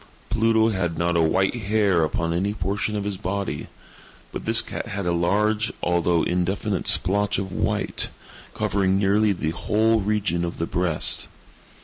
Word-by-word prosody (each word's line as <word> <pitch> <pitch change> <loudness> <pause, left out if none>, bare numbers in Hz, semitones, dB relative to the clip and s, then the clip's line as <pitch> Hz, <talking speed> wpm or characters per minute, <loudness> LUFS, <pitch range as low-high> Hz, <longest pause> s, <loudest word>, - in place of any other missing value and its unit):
Pluto 110 0 +3
had 90 -5 -2
not 85 +1 0
a 85 - +3
white 95 +4 +2
hair 105 -6 +1
upon 85 +2 -1
any 100 +4 -1
portion 100 +2 -2
of 105 - -2
his 100 -1 -3
body; 95 -6 -3 0.6
but - - -6
this - - +5
cat - - -6
had 100 -1 -4
a 85 - +1
large, 105 +6 +1
although 85 -1 +2
indefinite 95 +3 -1
splotch 100 +2 +3
of 95 -1 -4
white, - - -1 0.5
covering 95 -1 +1
nearly 100 +2 +3
the 80 -5 -2
whole 110 +6 +1
region 100 -4 0
of 85 0 -4
the 85 - -1
breast. 85 -2 -1
95 Hz, 155 wpm, -23 LUFS, 85-105 Hz, 0.6 s, this